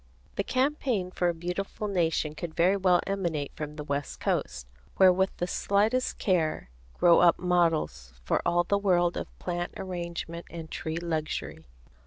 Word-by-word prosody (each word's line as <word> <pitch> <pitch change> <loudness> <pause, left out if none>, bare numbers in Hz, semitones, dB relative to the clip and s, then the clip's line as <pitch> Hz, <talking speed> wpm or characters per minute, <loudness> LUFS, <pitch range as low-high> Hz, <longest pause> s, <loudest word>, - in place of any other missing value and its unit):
The 200 - 0
campaign 255 -7 0
for 180 -1 +1
a - - 0
beautiful 180 +5 -4
nation 165 -5 0
could 160 0 -6
very 180 +3 +4
well 185 -3 +3
emanate 170 -8 -2
from 150 0 -6
the 150 - -6
west 140 0 -3
coast, 60 - -1 0.3
where 185 -1 +7
with 190 +1 +2
the 175 - -1
slightest 210 +7 +1
care 160 - 0 0.3
grow 170 -1 +6
up 175 -1 +5
models 165 - +1
for - - +1
all 175 0 +2
the 200 +3 +1
world 175 -3 +2
of - - -6
plant 175 -1 -4
arrangement 170 -2 -5
and 165 -2 -8
tree 160 0 -4
luxury. 160 - -3
175 Hz, 160 wpm, -28 LUFS, 160-190 Hz, 0.3 s, where